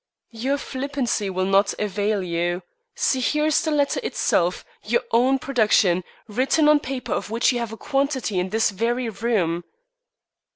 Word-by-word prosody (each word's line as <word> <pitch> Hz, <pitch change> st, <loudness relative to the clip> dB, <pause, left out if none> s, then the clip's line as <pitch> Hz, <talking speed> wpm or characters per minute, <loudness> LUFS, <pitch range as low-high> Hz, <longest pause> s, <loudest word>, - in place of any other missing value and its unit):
"Your 255 Hz, +5 st, -1 dB
flippancy 260 Hz, -7 st, -2 dB
will 185 Hz, 0 st, -1 dB
not 195 Hz, +1 st, +3 dB
avail 205 Hz, 0 st, -1 dB
you. 175 Hz, +1 st, -2 dB, 0.3 s
See, 265 Hz, -, +1 dB
here 300 Hz, +4 st, +1 dB
is 310 Hz, -1 st, +3 dB
the 315 Hz, -, -1 dB
letter 290 Hz, -2 st, +1 dB
itself 175 Hz, +1 st, 0 dB, 0.2 s
your 235 Hz, +3 st, +1 dB
own 255 Hz, +4 st, +4 dB
production 215 Hz, -9 st, +2 dB, 0.2 s
written 265 Hz, +8 st, +2 dB
on 300 Hz, 0 st, +6 dB
paper 265 Hz, -2 st, -4 dB
of -, -, -3 dB
which 230 Hz, +4 st, +2 dB
you 245 Hz, -, -1 dB
have 235 Hz, -2 st, -4 dB
a 225 Hz, -, -8 dB
quantity 270 Hz, -8 st, -1 dB
in 180 Hz, +1 st, -2 dB
this 220 Hz, +1 st, +1 dB
very 235 Hz, +4 st, -1 dB
room." 195 Hz, -6 st, -1 dB
230 Hz, 160 wpm, -23 LUFS, 195-270 Hz, 0.3 s, on